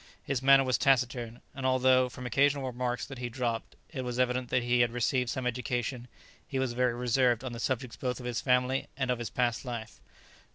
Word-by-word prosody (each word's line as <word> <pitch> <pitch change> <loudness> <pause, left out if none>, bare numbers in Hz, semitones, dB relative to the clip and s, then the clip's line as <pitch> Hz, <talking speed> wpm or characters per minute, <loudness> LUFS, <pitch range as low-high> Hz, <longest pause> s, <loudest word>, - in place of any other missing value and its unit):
His 135 -2 -2
manner 135 0 +6
was 130 -3 +1
taciturn, 125 -3 +1
and 135 - -7
although, 130 0 +4
from 125 0 -9
occasional 140 +3 +2
remarks 125 -1 -2
that 135 -3 -9
he 120 -1 -3
dropped, 120 -1 -3 0.2
it 140 -5 -4
was 125 -1 -4
evident 125 0 0
that 125 -1 +1
he 120 0 +2
had 120 0 +4
received 125 +1 0
some 130 +1 -3
education, 125 0 -2 0.4
he 135 - -3
was 130 -2 0
very 125 -1 +1
reserved 125 0 +2
on 130 -2 -5
the 115 - -6
subjects 125 0 -2
both 125 -1 -2
of 125 - -8
his 120 -2 -2
family 125 +1 +1
and 130 -2 0
of 125 - -1
his 120 - -4
past 120 -2 0
life. 120 -4 -6
125 Hz, 210 wpm, -30 LUFS, 120-130 Hz, 0.4 s, manner